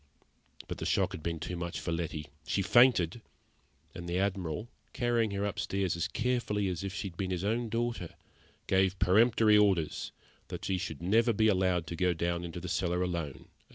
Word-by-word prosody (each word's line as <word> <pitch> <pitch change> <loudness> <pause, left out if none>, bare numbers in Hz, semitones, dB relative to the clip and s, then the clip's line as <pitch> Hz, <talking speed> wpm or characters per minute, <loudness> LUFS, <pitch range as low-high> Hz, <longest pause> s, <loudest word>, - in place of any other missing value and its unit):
But - - -5
the - - -4
shock - - +2
had - - -6
been 85 0 -3
too 90 - -4
much 85 0 -4
for 85 - -3
Letty; 80 -2 -3 0.2
she 100 - +1
fainted, 120 -4 +4 0.7
and 85 0 -7
the 85 - 0
Admiral, 95 0 -1 0.3
carrying 120 -2 +1
her 100 0 -2
upstairs 100 -2 -1
as 85 -1 -1
carefully 110 -2 0
as 90 0 -4
if 100 - -3
she 100 0 -4
had 85 - -18
been 95 -2 -2
his 90 -1 -2
own 115 +3 0
daughter, 115 -6 -2 0.5
gave 95 0 +2
peremptory 110 +2 +5
orders 95 -7 +1 0.4
that - - -6
she 95 -1 0
should 85 -4 -5
never 115 +6 +3
again 110 - +1
be - - +6
allowed 95 -3 +2
to 85 - -5
go 90 +2 +2 0.3
into 85 0 -6
the 90 - -6
cellar 90 0 0
alone. 80 -7 -4
95 Hz, 190 wpm, -31 LUFS, 85-105 Hz, 0.7 s, be